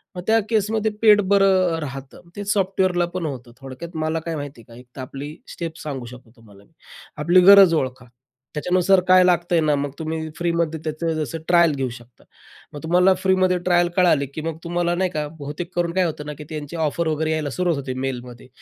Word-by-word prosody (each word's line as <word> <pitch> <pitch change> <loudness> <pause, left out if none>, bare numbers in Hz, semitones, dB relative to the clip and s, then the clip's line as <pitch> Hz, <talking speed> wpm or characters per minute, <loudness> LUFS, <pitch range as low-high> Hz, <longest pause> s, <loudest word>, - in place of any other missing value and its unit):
मग 180 - -5
त्या 225 +1 +4
केसमध्ये 220 0 0
पेड 210 -2 +6
बरं 190 -3 +3
अ, - - -4
राहतं. 135 -2 -8
तेच 205 0 -3
सॉफ्टवेअरला 185 -3 +1
पण 180 -3 -2
होतं. 130 -5 -6
थोडक्यात 135 +6 -9
मला 160 +1 -1
काय 165 0 -5
माहिती 145 -4 -7
आहे 115 - -17
का, 115 - -12
एक 125 - -16
तर 135 - -7
आपली 140 +3 -7 0.2
स्टेप 165 -1 -6
सांगू 135 -5 -5
शकतो 125 -1 -13
तुम्हाला 100 -3 -18
मी. - - -28 0.5
आपली 175 +3 +5
गरज 195 -4 +8
ओळखा. 130 -1 -6 0.5
त्याच्यानुसार 180 +4 +3
काय 185 0 +7
लागतंय 175 -1 +2
ना, 150 -1 +2
मग 140 0 -3
तुम्ही 160 0 -4
फ्रीमध्ये 170 -2 -1
त्याचं 160 +1 -2
जसं 155 0 -3
ट्रायल 170 -3 +4
घेऊ 135 -2 -2
शकता. 120 0 -20 0.5
मग 145 - -9
तुम्हाला 180 +3 +4
फ्रीमध्ये 185 -1 +2
ट्रायल 175 -1 +4
कळाली, 170 -6 +3
की 140 +4 -7
मग 165 -1 -4
तुम्हाला 175 0 -1
नाही 185 +1 0
का, 150 -3 -3
बहुतेक 150 +5 -6
करून 170 -1 0
काय 185 0 +2
होतं 150 -3 -4
ना, 150 - -4
की - - -7
त्यांची 155 0 -6
ऑफर 160 +1 -1
वगैरे 155 +1 -1
यायला 155 -2 -1
सुरुवात 175 +1 -1
होते 135 -2 -5
मेलमध्ये, 125 -2 -7
165 Hz, 205 wpm, -22 LUFS, 140-180 Hz, 0.5 s, गरज